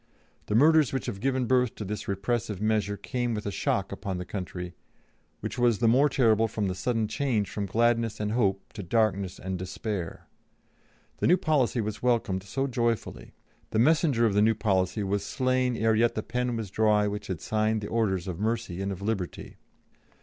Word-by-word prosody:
The 105 Hz, -, 0 dB
murders 155 Hz, +3 st, +5 dB
which 130 Hz, -4 st, -2 dB
have 95 Hz, -, -4 dB
given 130 Hz, +2 st, 0 dB
birth 125 Hz, -1 st, +2 dB
to 105 Hz, -, -6 dB
this 105 Hz, +2 st, -5 dB
repressive 100 Hz, +1 st, -2 dB
measure 105 Hz, -1 st, 0 dB
came 120 Hz, +3 st, -2 dB
with 105 Hz, -, -5 dB
a 100 Hz, -, -2 dB
shock 95 Hz, 0 st, -1 dB
upon 100 Hz, -1 st, -4 dB
the 90 Hz, -, -5 dB
country, 90 Hz, -2 st, -6 dB, 0.7 s
which -, -, -4 dB
was 120 Hz, -3 st, +3 dB
the 115 Hz, -, +2 dB
more 135 Hz, +6 st, +5 dB
terrible 115 Hz, -5 st, +3 dB
from 105 Hz, -2 st, -2 dB
the 95 Hz, -, -1 dB
sudden 110 Hz, +3 st, -1 dB
change 115 Hz, -6 st, -1 dB
from 100 Hz, -1 st, -3 dB
gladness 115 Hz, +1 st, +1 dB
and 105 Hz, 0 st, -1 dB
hope 100 Hz, -4 st, 0 dB
to 110 Hz, -, -6 dB
darkness 100 Hz, -1 st, 0 dB
and 95 Hz, -1 st, -4 dB
despair. 95 Hz, -1 st, -5 dB, 0.9 s
The -, -, +1 dB
new 180 Hz, -, +6 dB
policy 135 Hz, -8 st, +1 dB
was 105 Hz, 0 st, -4 dB
welcomed 115 Hz, -6 st, +1 dB
so 135 Hz, +8 st, -2 dB
joyfully; 120 Hz, -3 st, -2 dB, 0.3 s
the -, -, -2 dB
messenger 140 Hz, -1 st, +3 dB
of 110 Hz, -, +2 dB
the 105 Hz, -, +3 dB
new 110 Hz, +1 st, +4 dB
policy 95 Hz, -1 st, 0 dB
was 100 Hz, +1 st, -1 dB
slain 130 Hz, +1 st, 0 dB
ere 110 Hz, 0 st, +2 dB
yet 115 Hz, +2 st, +2 dB
the 110 Hz, -, -2 dB
pen 125 Hz, -1 st, -2 dB
was 105 Hz, -4 st, -5 dB
dry 105 Hz, -1 st, +3 dB
which 105 Hz, 0 st, -4 dB
had 95 Hz, -4 st, -3 dB
signed 110 Hz, 0 st, 0 dB
the 105 Hz, -, -4 dB
orders 95 Hz, -6 st, 0 dB
of 90 Hz, -3 st, -4 dB
mercy 110 Hz, -4 st, -2 dB
and 100 Hz, 0 st, -2 dB
of 95 Hz, 0 st, -6 dB
liberty. 100 Hz, -5 st, -4 dB
110 Hz, 195 wpm, -27 LUFS, 100-120 Hz, 0.9 s, new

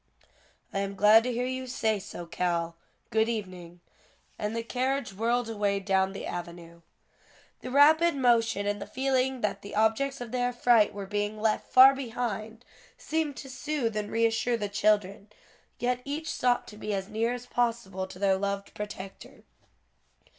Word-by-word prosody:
"I 195 Hz, -, -1 dB
am 200 Hz, 0 st, -3 dB
glad 210 Hz, +3 st, +7 dB
to 250 Hz, -, 0 dB
hear 245 Hz, +1 st, -1 dB
you 260 Hz, 0 st, -4 dB
say 220 Hz, -4 st, 0 dB
so, 175 Hz, -2 st, -8 dB
Cal. 170 Hz, -1 st, -2 dB, 0.4 s
Good 220 Hz, +1 st, +2 dB
evening." 180 Hz, -6 st, -6 dB, 0.6 s
And 210 Hz, +2 st, -2 dB
the 230 Hz, -, -2 dB
carriage 260 Hz, 0 st, -2 dB
whirled 235 Hz, +4 st, 0 dB
away 205 Hz, -3 st, 0 dB
down 190 Hz, -1 st, +1 dB
the 195 Hz, -, -7 dB
avenue. 170 Hz, -1 st, -7 dB, 0.8 s
The 255 Hz, -, -7 dB
rapid 310 Hz, +5 st, +5 dB
motion 230 Hz, -5 st, +2 dB
and 205 Hz, 0 st, -2 dB
the -, -, -6 dB
feeling 265 Hz, -1 st, 0 dB
that 200 Hz, -1 st, -1 dB
the 200 Hz, -, -8 dB
objects 225 Hz, +6 st, +1 dB
of 240 Hz, -2 st, -7 dB
their 245 Hz, 0 st, 0 dB
affright 240 Hz, -3 st, +4 dB
were 200 Hz, -1 st, -5 dB
being 205 Hz, +2 st, -2 dB
left 215 Hz, 0 st, 0 dB
far 260 Hz, +1 st, +9 dB
behind, 235 Hz, -3 st, -4 dB, 0.3 s
seemed 315 Hz, -, -2 dB
to 275 Hz, -, -8 dB
soothe 260 Hz, -5 st, -2 dB
and 210 Hz, -1 st, -2 dB
reassure 230 Hz, +1 st, +1 dB
the 205 Hz, -2 st, -3 dB
children, 205 Hz, -1 st, +1 dB, 0.5 s
yet 250 Hz, 0 st, -1 dB
each 300 Hz, +4 st, -4 dB
sought 245 Hz, -1 st, +1 dB
to 210 Hz, -, -12 dB
be 210 Hz, -1 st, -3 dB
as 190 Hz, -1 st, -4 dB
near 225 Hz, +2 st, -1 dB
as 245 Hz, 0 st, -9 dB
possible 230 Hz, -7 st, -1 dB
to 180 Hz, -, -11 dB
their 195 Hz, 0 st, +2 dB
loved 200 Hz, 0 st, -3 dB
protector. 195 Hz, -2 st, -8 dB
220 Hz, 165 wpm, -28 LUFS, 200-245 Hz, 0.8 s, far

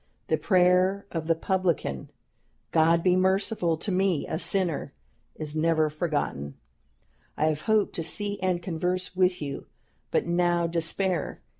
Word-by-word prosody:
The -, -, +2 dB
prayer 185 Hz, +1 st, +3 dB
of 160 Hz, -2 st, -4 dB
the 165 Hz, -, +3 dB
publican, 170 Hz, -, -1 dB, 0.6 s
'God 165 Hz, +1 st, +3 dB
be 180 Hz, -1 st, +4 dB
merciful 190 Hz, -2 st, +1 dB
to 200 Hz, -, -3 dB
me 185 Hz, -4 st, +1 dB
a 160 Hz, -, -3 dB
sinner!' 175 Hz, -8 st, 0 dB, 0.4 s
is 155 Hz, -1 st, -6 dB
never 155 Hz, -1 st, +2 dB
forgotten. 145 Hz, -, -2 dB, 0.8 s
I 155 Hz, -, +2 dB
have 155 Hz, -1 st, -2 dB
hoped 215 Hz, +3 st, +1 dB
to 165 Hz, -, -2 dB
see 205 Hz, +4 st, -1 dB
and 185 Hz, -2 st, -1 dB
converse 180 Hz, +2 st, -2 dB
with 180 Hz, -3 st, +2 dB
you, 140 Hz, -1 st, -6 dB, 0.4 s
but -, -, +1 dB
now 175 Hz, 0 st, +1 dB
despair. 170 Hz, +1 st, -1 dB
175 Hz, 140 wpm, -27 LUFS, 160-185 Hz, 0.8 s, be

